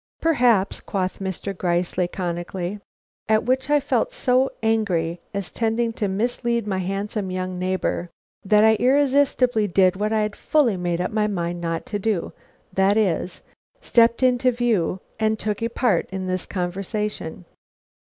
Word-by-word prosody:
"Perhaps," 240 -11 +2
quoth 185 -2 -3
Mr. 195 +1 -4
Gryce, 175 0 -1
laconically; 175 +1 -3 0.5
at 220 0 +3
which 260 +2 0
I 295 0 +4
felt 255 -4 0
so 255 +1 +2
angry, 180 -7 0
as 200 -2 -4
tending 230 0 0
to 210 - -1
mislead 235 +3 -1
my 195 -3 -1
handsome 195 +2 -3
young 185 0 -3
neighbor, 185 -1 -1 0.3
that 210 +2 +4
I 220 0 +6
irresistibly 260 -4 +3
did 185 0 +3
what 210 +2 -1
I 220 -1 +2
had 210 0 -2
fully 280 -9 +2
made 175 -1 -1
up 180 - -2
my 215 -1 +1
mind 175 -3 -3
not 165 -1 -3
to 205 - -3
do, 200 -4 -1 0.4
that 195 +2 +3
is, 185 -4 0 0.4
stepped 235 +1 +3
into 255 0 +3
view 225 -7 0 0.2
and 220 0 +1
took 210 -1 -3
a 230 - 0
part 235 -7 +1
in 190 -1 -4
this 185 -1 -3
conversation. 190 -1 -4
205 Hz, 150 wpm, -23 LUFS, 185-230 Hz, 0.5 s, I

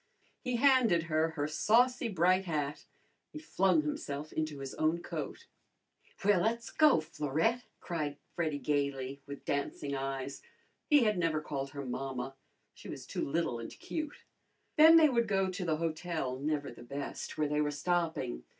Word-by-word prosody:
He 250 -2 -1
handed 240 -9 +4
her 160 0 +1
her 145 0 0
saucy 245 +9 +3
bright 185 0 +3
hat. 150 -3 -2 0.4
He - - -9
flung 190 - +2
himself 150 0 -4
into 155 -2 -2
his 135 -1 -6
own 160 +2 0
coat. - - -5 0.8
"Well, 200 -3 +5
le's 230 +2 -1
go, 305 - +5
Florette!" 160 - -1
cried 150 -5 -3 0.2
Freddy 155 -4 0
gayly, 140 -2 -1
with 140 0 -8
dancing 140 0 -2
eyes. 135 0 -3 0.5
He 295 -4 +6
had 210 -4 +2
never 165 -2 +1
called 140 -3 -4
her 140 0 -6
mamma. 130 +1 -4 0.4
She - - -12
was - - -7
too - - -3
little 140 -6 0
and 115 - -6
cute. 310 -2 -6 0.5
Then 320 +1 +9
they 320 -1 +7
would 235 -4 +1
go 195 -2 +1
to 180 0 -4
the 160 -2 +1
hotel, 160 -5 -2
never 145 0 -1
the - - -13
best, 140 +4 -6
where 150 - +1
they 150 +1 +1
were 150 - +1
stopping. 160 - -1
155 Hz, 160 wpm, -32 LUFS, 140-195 Hz, 0.8 s, Then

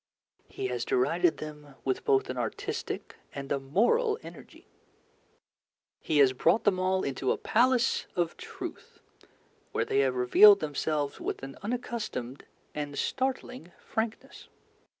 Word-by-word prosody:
He 400 - -5
has - - -2
derided 380 -4 +2
them 150 -2 -9
with 130 -1 -1
both 135 -1 +2
an - - -6
artistic 120 -3 -4 0.2
and 140 -1 -6
a 140 - +1
moral 240 - +2
energy. - - -13 1.3
He 155 - -1
has 135 -2 +6
brought 165 - +2
them 195 -3 +2
all 185 0 +1
into 135 -1 -1
a - - 0
Palace 250 +2 +2
of 170 -2 0
Truth, - - -9 0.7
where - - 0
they 135 - +1
have 135 -2 +2
revealed 200 +12 +7
themselves 150 -1 -2
with - - -4
an 135 0 -7
unaccustomed 210 - -4 0.3
and 145 -1 -5
startling 255 -8 -3
frankness. 220 0 -5
160 Hz, 130 wpm, -29 LUFS, -, 1.3 s, revealed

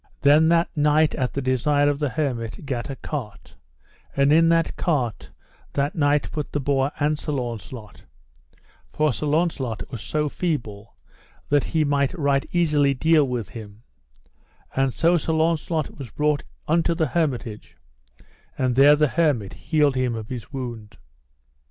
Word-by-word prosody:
Then 150 +3 +5
that 170 +1 +2
knight 150 +1 +3
at 130 -3 -1
the 140 - -3
desire 145 +3 +2
of 145 -1 0
the 150 -2 0
hermit 125 -5 -3
gat 130 -3 -3
a 135 - -4
cart, 115 - -7 0.6
and 140 +1 +4
in 165 +1 +5
that 165 0 +2
cart 130 - -1 0.4
that 140 +1 0
knight 145 -2 +1
put 150 -2 -4
the 145 - -1
boar 135 0 0
and 150 +1 +1
Sir 150 - -4
Launcelot, 120 -3 -6 0.9
for 155 -3 +1
Sir 150 - -4
Launcelot 145 - -1
was 120 -5 -6
so 150 +4 -1
feeble 115 - -4 0.5
that 145 -1 +2
they 160 -1 +3
might 140 +2 0
right 140 -3 +1
easily 150 -5 +2
deal 155 +1 +3
with 120 -5 -3
him; 110 -1 -11 0.9
and 135 0 +2
so 170 +7 +2
Sir 160 0 -2
Launcelot 160 0 0
was 135 -5 -8
brought 150 +4 0 0.3
unto 165 +1 +2
the 160 -1 +1
hermitage, 125 -7 -3 0.8
and 130 -2 0
there 140 +3 +7
the 150 0 +3
hermit 145 - 0
healed 150 -3 +1
him 125 -2 0
of 110 -1 -7
his 125 -2 -7
wound. 120 -6 -7
145 Hz, 155 wpm, -23 LUFS, 125-155 Hz, 0.9 s, there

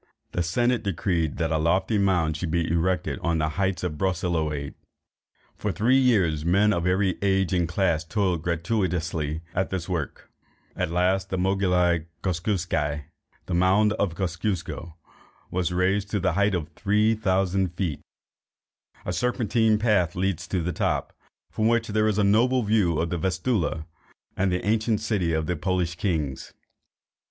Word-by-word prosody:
The 90 - -1
senate 120 +8 +1
decreed 85 -5 -1
that 80 -2 -1
a 80 - +1
lofty 95 +7 +1
mound 90 -6 +2
should 80 +1 -3
be 85 0 0
erected 85 0 0
on 85 -1 0
the 75 0 0
heights 95 +4 -1
of 75 -4 -3
Bronislawad. 80 -6 -1 0.8
For 105 - -2
three 120 +9 +3
years 95 - +2
men 100 +5 +3
of 85 0 -1
every 95 0 +1
age 95 -1 +1
and 85 -2 +1
class 85 -2 +1
toiled 90 0 0
gratuitously 85 -3 -1
at 95 +1 0
this 90 -3 -3
work, 85 -6 -4 0.4
and - - -6
at - - 0
last 95 +2 +1
the 95 - -2
Mogila 90 -3 +2 0.2
Kosziuszki, 85 -5 -1 0.4
the 90 - -4
mound 95 +4 +3
of 100 -6 -1
Kosciusko, 85 -2 -3 0.6
was 90 -1 0
raised 95 +3 +1
to 105 - 0
the - - +1
height 100 -1 +2
of 80 -2 -3
3000 100 -1 +1
feet! 85 -6 -2 1.0
A - - -2
serpentine 115 -3 +1
path 100 -6 +2
leads 90 -1 -1
to 90 -3 -1
the 90 +2 -2
top, - - -1 0.4
from 110 - +1
which 115 0 +1
there 110 +1 +2
is 105 -2 +1
a 105 - +3
noble 120 +5 +3
view 100 -7 +2
of 85 0 -1
the 90 - -1
Vistula, 90 -2 -1 0.5
and 95 0 +1
of 90 - +1
the - - -8
ancient 110 0 +1
city 105 -6 0
of 80 -1 0
the 90 - -1
Polish 90 0 -1
kings. 80 -7 -3
90 Hz, 160 wpm, -25 LUFS, 85-100 Hz, 1.0 s, three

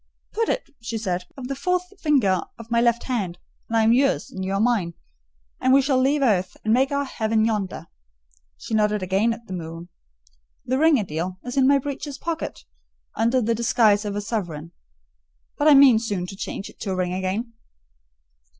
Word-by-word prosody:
'Put 455 +1 0
it,' - - -2
she 230 0 -4
said, 185 -4 -2
'on 260 - -7
the 275 - -3
fourth 360 +6 -2
finger 240 - +2 0.2
of 230 0 -12
my 235 0 +3
left 235 0 +2
hand, 200 -9 -2 0.3
and 230 - +1
I 225 - +4
am 225 +1 +5
yours, 270 +1 +1
and 190 -7 -5
you 190 - -3
are - - 0
mine; 210 -7 +1 0.6
and 260 - +2
we 275 - +6
shall 265 -1 +2
leave 275 +2 +2
earth, 190 -7 +1
and 220 - +3
make 265 +3 +3
our 280 0 +1
own - - -2
heaven 220 -3 0
yonder.' 200 -7 -2 0.7
She - - -8
nodded 210 -2 +1
again 195 +5 +1
at 230 0 -6
the 190 - -7
moon. 165 0 -7 0.8
The 260 +2 0
ring, 320 0 +5
Adèle, 180 -2 -3
is 245 - -5
in 265 -1 +4
my 280 0 +5
breeches 280 +1 -5
pocket, 330 +1 -5 0.5
under 235 +2 +1
the 230 +2 +1
disguise 225 -2 +3
of 205 -1 -4
a 205 - -2
sovereign: 175 -8 -4 0.8
but 290 - +1
I 300 - +8
mean 270 -5 +7
soon 205 -6 -3
to 195 - -8
change 195 - -5
it - - -15
to 205 - -4
a 190 - -1
ring 180 -1 -1
again." 190 +6 -3
225 Hz, 200 wpm, -23 LUFS, 190-265 Hz, 0.8 s, I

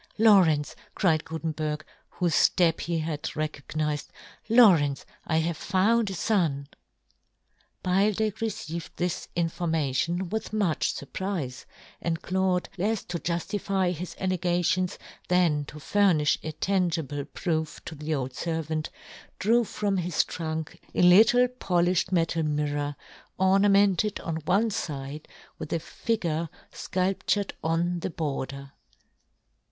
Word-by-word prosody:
" - - -34
Lawrence," 160 -7 +4 0.2
cried 160 -5 +2
Guten 160 0 -3
berg, 155 -1 -3 0.3
whofe 175 -3 +3
ftep 170 -3 +3
he 170 -1 -2
had 155 -2 -3
recognized, 150 -1 -3 0.2
" - - -30
Lawrence, 180 - +5 0.2
I 160 - +1
have 160 0 0
found 210 +5 +2
a 190 - -4
fon! 160 -8 0 0.6
" - - -27
Beildech 205 +3 +1
received 170 -7 -4
this 175 -1 -2
information 165 0 0
with 220 +1 -4
much 200 -8 +1
furprife, 150 -3 -4 0.4
and 165 -1 -1
Claude, 185 -1 0
lefs 210 +3 0
to 175 -1 -2
juftify 185 +2 -1
his 170 0 -6
allegations 180 -1 0 0.3
than 170 -5 +2
to 150 - -10
furnifh 165 -3 +3
a 155 - -3
tangible 165 -5 -1
proof 160 +2 -3
to - - -6
the 155 +1 -3
old 130 -2 -3
fervant, 160 +1 -3 0.5
drew 235 +4 +3
from 205 -2 -1
his 175 -1 +1
trunk 160 -2 -5 0.2
a - - +3
little 220 +8 +7
polifhed 180 -7 0
metal 165 -2 +1
mirror, 145 -1 -1 0.4
ornamented 195 +1 +3
on 165 -1 -3
one 205 +6 +2
fide 145 -4 -5 0.3
with - - -6
a 165 - +1
figure 170 -3 -2 0.2
fculptured 195 +2 -1
on 170 +2 0
the - - -3
border. 140 -4 -4
170 Hz, 125 wpm, -27 LUFS, 155-190 Hz, 0.6 s, little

